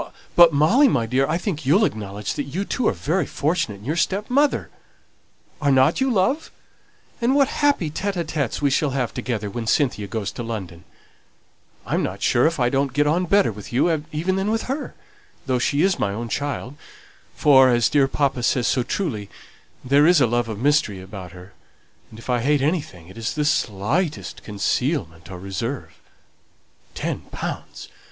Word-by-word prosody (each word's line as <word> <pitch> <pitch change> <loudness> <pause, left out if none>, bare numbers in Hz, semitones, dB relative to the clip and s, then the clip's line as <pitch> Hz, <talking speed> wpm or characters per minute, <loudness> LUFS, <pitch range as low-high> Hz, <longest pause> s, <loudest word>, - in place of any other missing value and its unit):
But, 170 -1 +8
Molly 180 - +4
my 125 - +1
dear, 130 +4 +1
I 160 - 0
think 175 -5 -3
you'll 175 +11 +4
acknowledge 105 - -4
that 145 - -3
you 180 +9 -3
too 250 - -1
are - - +4
very 160 +1 -1
fortunate 155 - -1
in 100 +2 -14
your 150 +5 -1
stepmother. 215 - +1 0.9
Are 145 -2 +2
not 130 - +3
you, 265 - +2
love? 250 +8 +1 0.7
And 245 +3 +2
what 280 -1 +4
happy 280 - +2
tÉte 195 +5 -3
ł - - -12
tÉtes 145 -4 -3
we 140 - +3
shall 145 +2 +2
have 125 -4 -1
together 120 -4 -3
when 115 +3 -5
Cynthia 110 -5 +1
goes 100 0 -3
to - - -7
London! 95 -7 -6 1.0
I'm - - 0
not - - -4
sure 120 +5 +4
if 165 -2 -2
I 120 - +3
don't 135 +1 0
get 145 +1 +2
on 170 +5 +1
better 200 - +3
with 105 -1 -10
you 150 +5 +1
even 175 +5 -1
than 195 +2 -1
with 225 +1 0
her, 270 +1 -4 0.5
though 130 -2 0
she 140 +5 +1
is 190 -1 +2
my 100 - 0
own 115 +3 -5
child; 140 0 -3 0.6
for, 135 -3 +6
as 120 -4 +3
dear 140 -2 +3
papa 135 -2 0
says 120 0 +1
so 130 0 +2
truly, 120 - -3 0.6
there 140 +4 +5
is 175 -2 +5
a 130 - +5
love 120 0 0
of 110 - -4
mystery 135 -6 +1
about 95 -2 -9
her; 90 +2 -13 0.6
and 110 - -13
if 115 - -12
I 125 -1 +1
hate 140 +3 +1
anything, 145 - -2
it 95 +5 -12
is 110 +4 -3
the 150 -1 0
slightest 145 - -1
concealment 100 - -2
or 95 - -7
reserve. 100 +8 -4 1.0
Ten - - -3
pounds! - - -6
140 Hz, 185 wpm, -22 LUFS, 115-165 Hz, 1.0 s, But